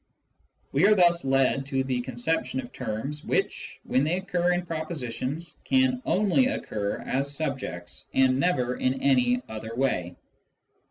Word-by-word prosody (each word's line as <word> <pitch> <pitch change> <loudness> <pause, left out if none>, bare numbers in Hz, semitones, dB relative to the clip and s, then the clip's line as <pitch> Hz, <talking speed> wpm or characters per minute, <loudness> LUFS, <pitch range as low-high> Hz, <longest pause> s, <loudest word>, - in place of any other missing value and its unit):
We 155 +8 +4
are 210 - +6
thus 175 -4 +4
led 135 0 +2
to 135 -2 0
the 130 -2 -1
conception 130 +2 -2
of 125 -2 -7
terms 135 +8 -4
which, - - -2
when 130 - +1
they 160 +4 +1
occur 180 -2 0
in 175 0 -1
propositions, 155 -2 -4
can 260 -1 +2
only 210 +6 +3
occur 105 - -3
as 140 +2 -2
subjects, 130 - -5
and 130 0 +3
never 125 -7 +1
in 130 +1 +1
any 125 -2 +3
other 110 +1 -6
way. 90 -10 0
135 Hz, 145 wpm, -27 LUFS, 125-170 Hz, -, are